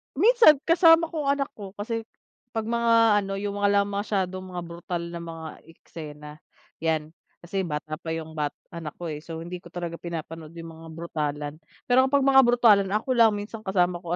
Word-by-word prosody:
Minsan 440 - +7
kasama 330 -1 +5
ko 305 -4 -3
ang 280 - +4
anak 280 - -12
ko, 200 -1 -8
kasi 225 +2 -4 0.5
'pag 225 - 0
mga 230 -1 +4
ano 195 -1 -4
yung 205 0 -3
mga 205 - +3
la 200 0 +4
masyadong 195 -2 -2
mga 175 - -3
brutal 170 0 -5
na 170 - -6
mga 165 -1 -7 0.2
eksena 150 -2 -10 0.5
yan, 160 -1 -1 0.3
kasi 190 +1 -2
bata 155 0 -4
pa 160 -1 -4
yung 160 -1 -6
bat 150 -2 -3 0.2
anak 165 -4 -7
ko, 170 -2 -5
eh, 150 - -5
so 165 +1 -7
hindi 180 +1 -6
ko 175 - -14
talaga 170 -1 -6
pinapanood 165 -1 -7
yung 165 0 -8
mga 165 0 -12
brutalan, 150 -3 -3 0.3
pero 260 +1 +4
kapag 280 0 +2
mga 270 0 +7
brutalan 225 -5 +5
ako 225 +5 -1
lang, 230 -3 +6
minsan 205 +2 -6
kasama 180 -4 +1
ko 175 -1 -3
180 Hz, 190 wpm, -26 LUFS, 165-225 Hz, 0.5 s, Minsan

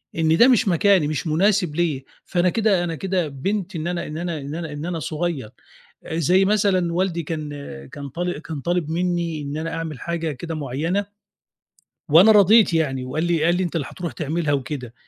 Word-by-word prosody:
إن 160 0 +2
ده 235 - +7
مش 245 -5 +4
مكاني، 185 -2 +3
مش 155 +2 -3
مناسب 180 0 +2
ليَّ 150 -6 -1 0.2
فأنا 180 0 +1
كده، 210 -4 +2
أنا 165 -2 -3
كده 185 -1 -1
بيّنت 190 +7 -3
إن 160 +1 -3
أنا 175 -1 -3
إن 155 - -6
أنا 170 -2 -3
إن 140 +2 -6
أنا 165 -2 -5
إن 145 +1 -5
أنا 170 -2 -3
صغيّر. 155 -8 -3 0.5
آآ 160 - -4
زي 180 +4 +3
مثلًا 190 -4 +2
والدي 175 -2 0
كان، 155 -1 -4 0.4
كان 140 -1 -7
طال 175 +3 -3
كان 155 -2 -6
طالب 175 0 -1
منّي 170 -2 -1
إن 145 +1 -5
أنا 165 +1 -4
أعمل 160 -5 -5
حاجة 165 -2 -3
كده 160 +4 -6
معيّنة 155 +8 -2 1.0
وأنا 175 +9 +7
رضيت 210 -2 +6
يعني 135 -5 0
وقال 150 +6 -2
لي 170 -2 +1
قال 175 +2 +3
لي: 185 - 0
"أنت 175 -1 -2
اللي 145 -5 -2
هترُوح 170 -6 -5
تعملها." 155 +3 -1
وكده، 130 -3 -3
165 Hz, 195 wpm, -22 LUFS, 150-180 Hz, 1.0 s, ده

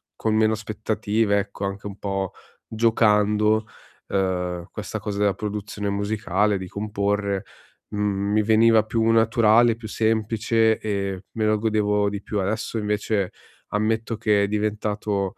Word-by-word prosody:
con 110 - -1
meno 110 0 +3
aspettative 110 -1 0
ecco 100 0 -4
anche 100 +1 -5
un 100 - -8
po' 95 -2 -2 0.4
giocando, 110 -1 +3 0.4
ehm, 90 -2 -1
questa 110 0 -5
cosa 100 -1 -4
della 100 -1 +3
produzione 105 0 -4
musicale, 100 0 0
di 95 -1 -6
comporre, 100 -1 -1 0.5
mhmm, 100 -1 -1
mi 110 - +3
veniva 110 +1 +5
più 115 +1 0
naturale, 115 0 +4
più 115 -1 -9
semplice 110 0 +1
e 100 -2 -3
me 110 -1 -1
lo 105 0 +2
godevo 105 -2 +1
di 100 -1 -5
più. 105 - -3
Adesso 110 +4 -2
invece 105 -2 -1 0.4
ammetto 110 +2 0
che 105 -2 +2
è - - +1
diventato 105 -1 -1
105 Hz, 135 wpm, -23 LUFS, 100-110 Hz, 0.5 s, veniva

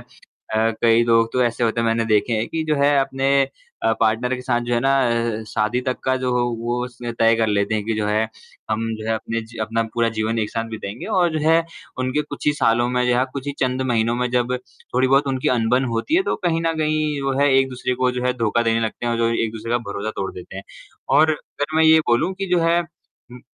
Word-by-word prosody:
अ, 110 +1 -4
कई 115 0 +5
लोग 115 -1 +3
तो 125 - +2
ऐसे 120 0 0
होते 115 0 0
हैं 115 - 0
मैंने 115 0 +1
देखे 105 +3 +2
हैं 110 +1 0
कि 160 - -2
जो 155 -1 +1
है 145 0 +4
अपने 135 0 0 0.5
अ, 115 - +3
पार्टनर 115 +3 +1
के 125 - -7
साथ 120 -1 0
जो 120 - -2
है - - +2
ना, 135 +2 +2 0.5
अ, - - -7
शादी 110 +5 0
तक 130 - 0
का 130 - +2
जो 130 -1 -2
हो 125 0 +2 0.2
वो 120 +1 -1
उसने 120 -1 -7
तय 115 0 +3
कर 115 - +1
लेते 105 0 0
हैं 105 -1 -1
कि 110 +1 -1
जो 105 -1 -1
है 105 +1 +1 0.5
हम 110 +1 -1
जो 110 0 -8
है 115 - +2
अपने 115 +1 -3
जी 115 +1 -13
अपना 115 +1 -1
पूरा 115 -1 +2
जीवन 110 +1 0
एक 105 -1 -1
साथ 115 -1 -2
बिताएँगे 110 0 -6
और 175 -2 +3
जो 155 - -1
है 165 0 +6 0.4
उनके 130 +4 0
कुछ - - -8
ही 150 - +5
सालों 120 -4 +2
में 125 0 0
जो 125 0 +2
है, 130 - +3
कुछ 140 0 -6
ही 145 - -2
चंद 130 0 0
महीनों 115 0 +1
में 125 0 -1
जब 125 0 0 0.4
थोड़ी-बहुत 135 +3 +3
उनकी 130 -1 0
अनबन 120 +3 +2
होती 115 - -1
है 380 - +4
तो 420 - -1
कहीं 165 -2 +1
न 165 - +2
कहीं 155 -2 0
वो 135 0 0
है 145 - +4
एक-दूसरे 130 -1 -1
को 125 0 +1
जो 125 0 -3
है 125 - +2
धोखा 115 +1 +1
देने 115 0 +1
लगते 115 +1 -3
हैं 120 - +1
और 115 - -1
जो 115 0 +2 0.2
एक-दूसरे 115 +1 -5
का 120 - +3
भरोसा 100 +2 -3
तोड़ 95 - -2
देते 90 +1 -10
हैं। 95 - -6 0.6
और 155 0 +5
अगर 150 0 -4
मैं 160 - +5
ये 160 0 +7
बोलूँ 155 +11 +2
कि 195 +1 -4
जो 180 -1 +3
है 170 +1 +3
उम, 145 -7 -14
120 Hz, 250 wpm, -21 LUFS, 115-135 Hz, 0.6 s, ये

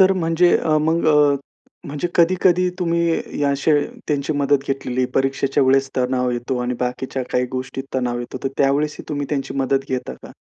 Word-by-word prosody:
तर 190 0 +6
म्हणजे 175 -1 +3
अ, 155 -1 +1
मग 160 +2 +1
अ, 150 -2 +4 0.5
म्हणजे 145 +4 -3
कधी-कधी 180 +1 +3
तुम्ही 170 -4 0
अशी 140 +3 +1 0.4
त्यांची 145 0 0
मदत 145 -1 +1
घेतलेली 130 -2 -1
परीक्षेच्या 135 +1 +1
वेळेस 135 +1 +3
तणाव 125 0 +1
येतो 120 +2 -2
आणि 125 0 -2
बाकीच्या 125 +1 -3
काही 125 0 +1
गोष्टी 130 +1 -4
तणाव 125 -2 -1
येतो. 120 +1 -6
तर 135 - +2
त्यावेळेस 145 +2 +1
ही - - -8
तुम्ही 145 -2 -3
त्यांची 140 -2 -2
मदत 135 0 +1
घेता 130 -1 -3
का? - - -11
140 Hz, 170 wpm, -20 LUFS, 130-160 Hz, 0.5 s, तर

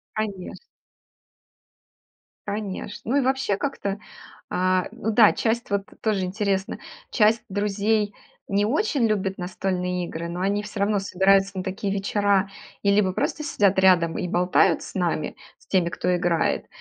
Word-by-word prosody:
Конеч 205 -4 -4 1.9
Конечно. 210 +1 -5
Ну 275 - +3
и - - +4
вообще 265 -6 0
как-то, 205 -8 -3 0.5
а, 185 0 +1
ну 220 - -3
да, 215 -1 +6
часть 235 +1 -1
вот 200 -1 0 0.2
тоже 215 -3 0
интересно, 195 +1 -1 0.3
часть 220 +1 +3
друзей 205 +1 0 0.3
не 200 +1 +1
очень 275 - +1
любит 195 -3 0
настольные 180 0 -2
игры, 170 0 -5
но 175 +1 -5
они 200 +2 0
все 205 0 -7
равно 205 +1 +2
собираются 195 +1 +2
на 185 - -2
такие 195 +1 -3
вечера 200 0 +1 0.3
и 200 - +3
либо 200 -3 +3
просто 305 +10 -2
сидят 200 -9 +2
рядом 180 -3 +4
и 180 -4 -3
болтают 180 -1 +3
с - - -10
нами- 170 -4 -1 0.2
с - - -25
теми, 180 -3 +2
кто 180 +1 0
играет, 175 -2 0
195 Hz, 145 wpm, -24 LUFS, 185-210 Hz, 1.9 s, да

